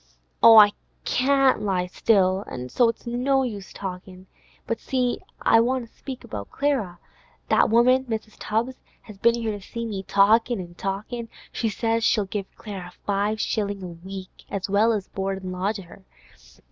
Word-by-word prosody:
'Oh, 225 -1 +9
I 205 -1 +9 0.3
can't 270 -2 +3
lie 190 -3 0
still, 190 0 +2 0.3
so 240 - +3
it's 230 - -6
no 260 +3 +1
use 210 -6 -5
talkin'! 185 -1 -8 0.4
But 230 - -2
see, 250 -2 -1 0.2
I 225 - +6
want 245 +1 0
to - - -33
speak 265 -3 -8
about 100 -2 -7
Clara. 260 -11 -1 0.5
That - - +4
woman 250 +3 +4
Mrs. 220 -2 -5
Tubbs 235 +4 -1 0.3
has 210 -3 -13
been 235 +2 +4
here 230 -2 -2
to 205 -1 -6
see 230 +4 -6
me, 205 -4 -4
talkin' 220 +4 +3
an' 175 -2 -8
talkin'. 210 +6 -4 0.2
She 225 - -1
says 225 +1 0
she'll 210 -2 +3
give 195 0 -4
Clara 190 -5 -7
five 205 +2 0
shillin' 205 -3 -2
a - - -5 0.2
week, 190 -1 -9
as 200 -1 -3
well 205 +3 +3
as 205 -4 -2
board 195 0 -3
an' 185 - -4
lodge 190 +4 -1
her. 190 0 -13
215 Hz, 170 wpm, -24 LUFS, 195-235 Hz, 0.5 s, Oh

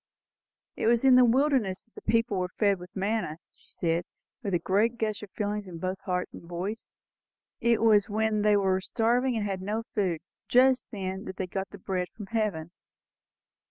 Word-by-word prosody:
"It - - -1
was 235 +1 +3
in 265 -1 +7
the 255 - +8
wilderness 245 -6 +2
that 230 - -35
the - - -11
people 230 -4 +2
were 180 0 -1
fed 200 -3 +3
with 180 0 -12
manna," 195 -5 -1 0.2
she - - -28
said, 170 0 -1 0.4
with 200 -6 -1
a - - +5
great 205 +7 +1
gush 215 -2 -2
of 210 - -9
feeling 210 +1 -2
in 175 -2 -8
both 185 +3 -3
heart 180 -1 -1
and - - -9
voice. 175 +6 -5 0.7
"It 235 -1 +2
was 210 -2 +5
when 215 0 +1
they 210 0 +4
were 190 -1 +2
starving 240 +4 +1
and 210 - -1
had 195 -2 -3
no 210 +4 -2
food, 180 -7 0 0.3
just 255 0 +4
then, 190 -2 -4
that 190 - -7
they 190 - -1
got 190 +1 -4
the 205 - -10
bread 185 -1 -2
from 210 - -7
heaven." 200 -8 -1
205 Hz, 195 wpm, -28 LUFS, 185-225 Hz, 0.7 s, the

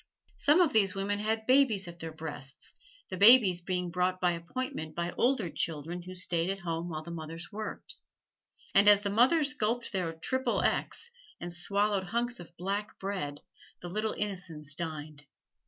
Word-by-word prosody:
Some 300 +5 +5
of 340 - +3
these 200 -4 +3
women 200 +1 -1
had 220 +1 -1
babies 255 -7 +4
at 170 0 -10
their 165 -1 -6
breasts, 150 -4 -8 0.4
the 185 - -5
babies 200 -4 +7
being 180 0 -2
brought 180 +1 0
by 180 -1 +3
appointment 170 -2 -5
by 170 0 -2
older 245 -4 +1
children 165 +2 -3
who 185 +1 -9
stayed 175 -1 0
at 195 0 -3
home 165 0 -3
while 155 -1 -5
the 170 - -8
mothers 165 +2 -7
worked. 215 +1 -6 0.8
And 200 +1 +6
as 205 -1 +8
the 200 -1 -2
mothers 280 +7 +4
gulped 235 -2 -1
their 185 -5 -1
Triple 260 +11 -1
XXX, 470 - -1 0.3
and 175 0 -6
swallowed 200 +2 0
hunks 235 +4 -2
of 175 0 -12
black 200 +4 -3
bread, 180 -8 -4 0.4
the 175 - -6
little 215 +4 -1
innocents 170 -8 -5
dined. 150 -2 -6
185 Hz, 170 wpm, -30 LUFS, 170-215 Hz, 0.8 s, as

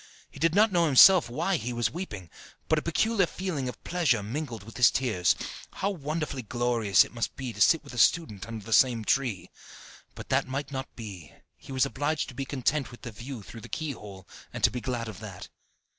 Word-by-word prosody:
He - - -12
did 165 +1 +2
not 215 +1 +5
know 170 -2 +3
himself 155 +2 +7
why 170 +9 0
he 125 -3 -4
was 120 -1 0
weeping, 105 - -6 0.4
but 160 - +3
a - - -7
peculiar 195 +4 +1
feeling 165 -10 -3
of 125 - -10
pleasure 145 - +1
mingled 115 -1 -5
with 115 +2 -11
his 125 -2 +7
tears. 110 -9 +1 0.4
How 200 - -1
wonderfully 155 -4 -3
glorious 115 -4 +2
it - - -14
must 115 -1 -3
be 130 -3 -5
to - - -7
sit 165 -2 +5
with 140 - -11
the 120 - -4
student 110 - +2
under 110 -3 -7
the 115 - -2
same 115 -2 +4
tree! 120 -8 0 0.6
But - - -10
that - - +1
might 135 +2 -4
not 130 -1 -6
be, 95 - -9 0.2
he - - -13
was 130 0 +2
obliged 145 +2 -2
to - - -10
be 135 +2 -4
content 135 -1 -1
with 120 - -14
the 120 - -6
view 115 +1 -8
through 115 +3 -11
the 120 - -11
keyhole, 105 - -6 0.2
and - - -7
to - - +5
be 125 - -4
glad 120 -2 -3
of 105 -4 -8
that. 100 -4 -9
130 Hz, 215 wpm, -28 LUFS, 115-155 Hz, 0.6 s, himself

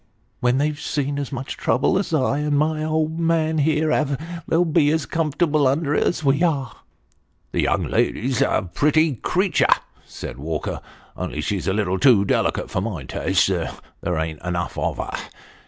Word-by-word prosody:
" - - -40
Ah! - - -42 0.2
when 125 +1 +2
they've 150 +1 0
seen 145 -1 -2
as 140 - -4
much 135 0 -5
trouble 125 +10 +1
as 195 - -3
I 140 -2 +1
and 150 -1 +1
my 155 +1 +1
old 155 +1 0
man 160 -1 +1
here 155 +1 +2
have, 145 -3 +1 0.3
they'll 170 +2 +3
bo 165 0 +3
as 150 +2 +2
comfortable 155 -2 +1
under 145 +2 +1
it - - +2
as 165 - -1
wo 135 -1 +4
are." 140 -9 0 0.4
" - - -43
The - - 0
young - - +1
lady's 125 +1 0
a 95 - +1
pretty 155 -1 +3
creature," 190 - +1 0.4
said - - -8
Walker, 75 +2 -3 0.3
only - - -4
she's 100 -2 -2
a 95 - +2
little 95 -3 0
too 110 -6 +5
delicate - - 0
for 90 - 0
my 95 -9 -4
taste - - +1
there 90 -2 -4
ain't 80 -1 -3
enough 90 0 -2
of - - -1
her. - - -4
145 Hz, 185 wpm, -22 LUFS, 115-155 Hz, 0.4 s, too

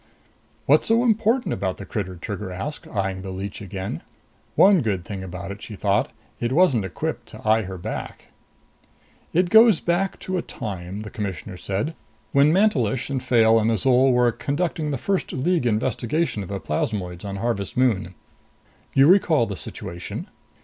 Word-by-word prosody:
"What's - - +4
so 230 +2 +4
important 225 -2 +2
about 95 -1 -2
the 100 - -8
critter?" 95 -4 -4
Trigger 95 +2 -5
asked, 100 +12 -6
eyeing 95 -2 -2
the 95 - -6
leech 95 +2 -6
again. 95 -1 -5 0.5
One 195 -3 +6
good 100 -6 -1
thing 100 -2 -6
about 95 +2 -6
it, 100 +2 -8
she 110 - -8
thought 100 +1 +1 0.3
it 120 0 -1
wasn't 135 - +3
equipped 95 - -4
to - - -10
eye 110 +1 +4
her 95 -2 -6
back. 90 - -6 1.0
"It 175 +1 +2
goes 220 -4 +7
back 175 +3 0
to 185 - -5
the 180 - +1
time," 100 - -6
the 105 - -8
Commissioner 100 -2 -5
said, 100 - -3 0.4
"when 140 +2 +5
Mantelish 145 - +2
and 130 -2 -1
Fayle 115 -2 +4
and 110 +1 +1
Azol 125 +4 +4
were 125 -1 +4
conducting 155 +4 -2
the 140 - -1
first 195 +9 -1
League 150 0 +1
investigation 120 +4 0
of 95 - -7
the 100 -1 -3
plasmoids 90 +2 -3
on 100 -1 -5
Harvest 100 -1 -2
Moon. 100 -8 +1 0.8
You 135 - +7
recall 165 -6 +5
the 100 - -5
situation?" 85 -1 -6
110 Hz, 165 wpm, -23 LUFS, 95-150 Hz, 1.0 s, goes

